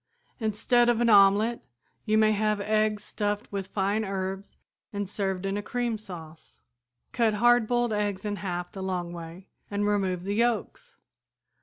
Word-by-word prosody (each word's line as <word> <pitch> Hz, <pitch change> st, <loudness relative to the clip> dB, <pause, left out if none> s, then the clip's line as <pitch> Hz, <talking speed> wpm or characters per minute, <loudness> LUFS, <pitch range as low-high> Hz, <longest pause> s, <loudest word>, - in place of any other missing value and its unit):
"Instead 240 Hz, +2 st, +2 dB
of 235 Hz, -1 st, +2 dB
an 235 Hz, -1 st, +3 dB
omelette 205 Hz, +3 st, +4 dB, 0.4 s
you 215 Hz, -1 st, +2 dB
may 215 Hz, 0 st, +5 dB
have 215 Hz, 0 st, +1 dB
eggs 215 Hz, 0 st, +1 dB
stuffed 205 Hz, 0 st, -2 dB
with 195 Hz, -2 st, -4 dB
fine 200 Hz, +3 st, 0 dB
herbs 195 Hz, 0 st, -4 dB, 0.3 s
and 205 Hz, -1 st, -3 dB
served 195 Hz, -1 st, -2 dB
in 195 Hz, +1 st, -1 dB
cream 240 Hz, +1 st, -2 dB
sauce. 165 Hz, -6 st, -11 dB, 0.5 s
Cut 225 Hz, -3 st, +2 dB
hard 240 Hz, +1 st, +4 dB
boiled 240 Hz, -1 st, +1 dB
eggs 205 Hz, -1 st, -2 dB
in 205 Hz, -1 st, -2 dB
half 180 Hz, -3 st, -4 dB
the 195 Hz, -, -7 dB
long 180 Hz, -2 st, -3 dB
way 170 Hz, +2 st, -9 dB, 0.2 s
and 205 Hz, 0 st, -1 dB
remove 190 Hz, -4 st, 0 dB
the 200 Hz, +2 st, -2 dB
yolks. 240 Hz, -, -1 dB
205 Hz, 155 wpm, -27 LUFS, 190-220 Hz, 0.5 s, may